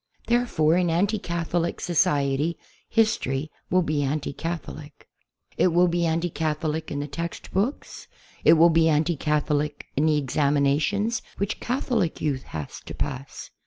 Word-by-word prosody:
Therefore, 230 Hz, -10 st, +2 dB
in 180 Hz, -1 st, +2 dB
anti 200 Hz, +6 st, +1 dB
Catholic 170 Hz, -1 st, -2 dB
society 145 Hz, -1 st, +1 dB, 0.3 s
his 220 Hz, -1 st, +3 dB
tory 135 Hz, +4 st, -3 dB, 0.2 s
will 185 Hz, 0 st, +3 dB
be 155 Hz, -2 st, 0 dB
anti 145 Hz, +1 st, -2 dB
Catholic. 155 Hz, -2 st, -6 dB, 0.5 s
It -, -, +4 dB
will 175 Hz, +1 st, +4 dB
be 170 Hz, 0 st, +1 dB
anti 165 Hz, +1 st, 0 dB
Catholic 155 Hz, 0 st, -2 dB
in 145 Hz, -, -3 dB
the 145 Hz, -, -3 dB
textbooks. 170 Hz, -, -3 dB, 0.4 s
It -, -, +7 dB
will 170 Hz, +1 st, +6 dB
be 165 Hz, 0 st, +4 dB
anti 160 Hz, +3 st, +2 dB
Catholic 150 Hz, 0 st, -1 dB
in 150 Hz, +3 st, +2 dB
the 155 Hz, -1 st, +3 dB
examinations 150 Hz, -, +1 dB, 0.2 s
which 200 Hz, +2 st, -2 dB
Catholic 240 Hz, -, -1 dB
youth 140 Hz, -4 st, -2 dB
has 75 Hz, -3 st, -6 dB
to -, -, -6 dB
pass. 135 Hz, -1 st, -5 dB
160 Hz, 145 wpm, -25 LUFS, 145-175 Hz, 0.5 s, It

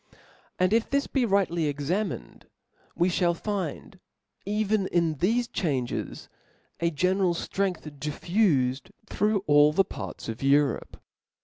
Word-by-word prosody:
And 185 Hz, +2 st, +2 dB
if 230 Hz, 0 st, +2 dB
this 280 Hz, 0 st, +1 dB
be 265 Hz, -3 st, 0 dB
rightly 190 Hz, -6 st, +1 dB
examined, 150 Hz, -, -3 dB, 0.5 s
we 175 Hz, -, +2 dB
(hall 175 Hz, -1 st, +1 dB
find, 190 Hz, -1 st, -4 dB, 0.5 s
even 210 Hz, -1 st, +1 dB
in 170 Hz, -2 st, +1 dB
thcfe 230 Hz, -, +1 dB
changes, 135 Hz, -8 st, -2 dB, 0.5 s
a 170 Hz, -, +1 dB
general 180 Hz, +2 st, +1 dB
ftrength 190 Hz, +1 st, -2 dB, 0.2 s
diffufed 150 Hz, -, 0 dB, 0.2 s
through 210 Hz, 0 st, 0 dB
^11 145 Hz, +1 st, +5 dB
the 195 Hz, -, +4 dB
parts -, -, -7 dB
of 115 Hz, 0 st, -5 dB
Europe. 140 Hz, -1 st, +1 dB
180 Hz, 120 wpm, -27 LUFS, 150-200 Hz, 0.5 s, ^11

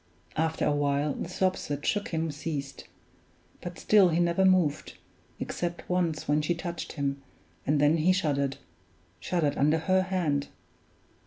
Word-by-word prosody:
After 160 Hz, +1 st, 0 dB
a 150 Hz, -, +3 dB
while 145 Hz, 0 st, +1 dB
the -, -, -5 dB
sobs 185 Hz, 0 st, 0 dB
that 145 Hz, 0 st, -4 dB
shook 205 Hz, -3 st, 0 dB
him 160 Hz, -1 st, -2 dB
ceased; 145 Hz, -2 st, -5 dB, 0.8 s
but 175 Hz, -1 st, -7 dB
still 200 Hz, -4 st, +5 dB
he 165 Hz, +1 st, +1 dB
never 175 Hz, +2 st, +2 dB
moved, 180 Hz, -6 st, +2 dB, 0.4 s
except 175 Hz, 0 st, -4 dB
once 175 Hz, -4 st, 0 dB
when 150 Hz, +1 st, +3 dB
she 170 Hz, +3 st, 0 dB
touched 170 Hz, 0 st, -5 dB
him, 140 Hz, -2 st, -2 dB, 0.5 s
and 145 Hz, +1 st, +3 dB
then 145 Hz, +3 st, +4 dB
he 165 Hz, +4 st, +3 dB
shuddered 140 Hz, -7 st, 0 dB, 0.6 s
shuddered 155 Hz, -, 0 dB
under 150 Hz, +3 st, +4 dB
her 185 Hz, +4 st, +2 dB
hand! 170 Hz, -7 st, 0 dB
160 Hz, 150 wpm, -28 LUFS, 145-180 Hz, 0.8 s, still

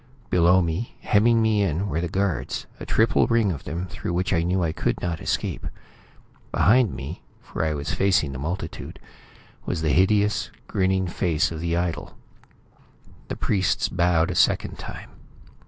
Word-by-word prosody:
Below 90 Hz, +1 st, +5 dB
me, 85 Hz, +8 st, -3 dB
hemming 115 Hz, +2 st, +3 dB
me 110 Hz, -2 st, +2 dB
in, 95 Hz, +1 st, 0 dB
were 85 Hz, -3 st, -1 dB
the 85 Hz, -, -1 dB
guards; 95 Hz, 0 st, -1 dB
a -, -, -8 dB
triple 110 Hz, +1 st, +3 dB
ring 115 Hz, -4 st, +2 dB
of 70 Hz, -6 st, -6 dB
them, 85 Hz, +2 st, -3 dB
through 95 Hz, -1 st, -5 dB
which 90 Hz, +2 st, 0 dB
I 85 Hz, -, +3 dB
knew 90 Hz, +2 st, 0 dB
I 80 Hz, -, 0 dB
could -, -, -1 dB
not 85 Hz, -2 st, -3 dB
escape. -, -, -2 dB, 0.8 s
Behind 115 Hz, -, +4 dB
me, 70 Hz, +6 st, -7 dB, 0.2 s
for -, -, -4 dB
I 80 Hz, -1 st, 0 dB
was 75 Hz, +1 st, -3 dB
facing 95 Hz, -7 st, +2 dB
the 65 Hz, -, -6 dB
multitude, 85 Hz, +7 st, -5 dB, 0.7 s
was 80 Hz, -3 st, -2 dB
the 75 Hz, -, +2 dB
hideous, 105 Hz, +3 st, +2 dB, 0.2 s
grinning 95 Hz, 0 st, +1 dB
face 85 Hz, -1 st, 0 dB
of 80 Hz, -, -5 dB
the 85 Hz, +1 st, -1 dB
idol. 85 Hz, -1 st, -3 dB, 1.1 s
The -, -, -4 dB
priests 95 Hz, -2 st, 0 dB
bowed 85 Hz, -1 st, +2 dB
a -, -, -4 dB
second -, -, +2 dB
time. -, -, -8 dB
90 Hz, 165 wpm, -24 LUFS, 80-100 Hz, 1.1 s, Below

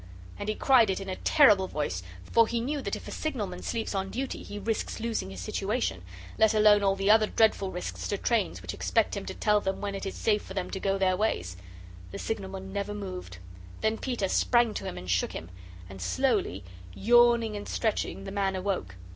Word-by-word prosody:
And 205 Hz, -, -3 dB
he 215 Hz, -, 0 dB
cried 250 Hz, -6 st, +5 dB
it 190 Hz, -, 0 dB
in 195 Hz, -1 st, -6 dB
a 185 Hz, -, -2 dB
terrible 210 Hz, -11 st, +5 dB
voice, 145 Hz, -, -2 dB, 0.2 s
for 230 Hz, -, +4 dB
he 235 Hz, -, -1 dB
knew 280 Hz, +5 st, -2 dB
that -, -, -2 dB
if -, -, -9 dB
a -, -, -6 dB
signalman 205 Hz, -12 st, -3 dB
sleeps 225 Hz, -2 st, -3 dB
on 195 Hz, -1 st, -2 dB
duty, 260 Hz, +5 st, -4 dB
he 205 Hz, -, -8 dB
risks 220 Hz, +3 st, -2 dB
losing 225 Hz, -, -2 dB
his 95 Hz, -1 st, -7 dB
situation, 95 Hz, +1 st, -2 dB, 0.4 s
let 220 Hz, 0 st, +5 dB
alone 210 Hz, -1 st, +6 dB
all 195 Hz, -1 st, +2 dB
the 195 Hz, +1 st, +3 dB
other 215 Hz, 0 st, +5 dB
dreadful 215 Hz, -4 st, +2 dB
risks 180 Hz, -1 st, -5 dB
to 205 Hz, -, -1 dB
trains 195 Hz, -, 0 dB
which 90 Hz, +1 st, -5 dB
expect 150 Hz, -, +1 dB
him 200 Hz, -, -5 dB
to -, -, -5 dB
tell 210 Hz, -1 st, +2 dB
them 190 Hz, -1 st, -2 dB
when 200 Hz, -1 st, -3 dB
it 195 Hz, 0 st, -4 dB
is -, -, -5 dB
safe 210 Hz, -2 st, +1 dB
for 190 Hz, -, -10 dB
them 185 Hz, -2 st, -3 dB
to 190 Hz, -, -3 dB
go 195 Hz, 0 st, 0 dB
their 190 Hz, -1 st, +2 dB
ways. 95 Hz, -, -1 dB, 0.5 s
The -, -, -7 dB
signalman 195 Hz, -3 st, -5 dB
never 205 Hz, +1 st, -3 dB
moved. 185 Hz, -, -6 dB, 0.4 s
Then 220 Hz, 0 st, +1 dB
Peter 240 Hz, -7 st, -1 dB
sprang 240 Hz, +3 st, +3 dB
to -, -, -5 dB
him 90 Hz, -, -5 dB
and 90 Hz, +1 st, -8 dB
shook 90 Hz, 0 st, +1 dB
him. 80 Hz, +3 st, -7 dB, 0.4 s
And 95 Hz, 0 st, -10 dB
slowly, 90 Hz, +1 st, 0 dB, 0.3 s
yawning 235 Hz, -, +4 dB
and 205 Hz, -, -6 dB
stretching, 210 Hz, -, -1 dB
the -, -, -6 dB
man 195 Hz, -1 st, 0 dB
awoke. 185 Hz, -, -2 dB
200 Hz, 215 wpm, -28 LUFS, 185-220 Hz, 0.5 s, alone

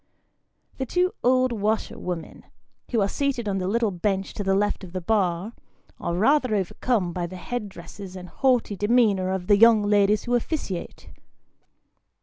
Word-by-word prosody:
The 265 Hz, -, -2 dB
two 360 Hz, +5 st, +1 dB
old 255 Hz, +1 st, +3 dB
washerwomen, 205 Hz, -5 st, -3 dB, 0.4 s
who 230 Hz, -4 st, +1 dB
are 195 Hz, -, +2 dB
seated 260 Hz, -1 st, -2 dB
on 195 Hz, -1 st, -1 dB
the 185 Hz, -, -2 dB
little 225 Hz, +1 st, +1 dB
bench 195 Hz, +1 st, -2 dB
to 205 Hz, -, -4 dB
the 195 Hz, 0 st, +2 dB
left 205 Hz, 0 st, 0 dB
of 180 Hz, -2 st, -10 dB
the 185 Hz, -, -2 dB
bar, 185 Hz, +1 st, 0 dB, 0.5 s
are 170 Hz, -, -2 dB
rather 255 Hz, +3 st, +3 dB
overcome 195 Hz, 0 st, -1 dB
by 175 Hz, -1 st, -2 dB
the 185 Hz, -, -9 dB
headdresses 195 Hz, -2 st, -7 dB
and 180 Hz, -1 st, -8 dB
haughty 250 Hz, -2 st, +1 dB
demeanour 205 Hz, -3 st, +2 dB
of 190 Hz, -1 st, -2 dB
the 205 Hz, +1 st, +5 dB
young 225 Hz, -1 st, +6 dB
ladies 205 Hz, 0 st, +3 dB
who 245 Hz, -, -2 dB
officiate. 240 Hz, -, -3 dB
205 Hz, 155 wpm, -24 LUFS, 185-235 Hz, 0.5 s, young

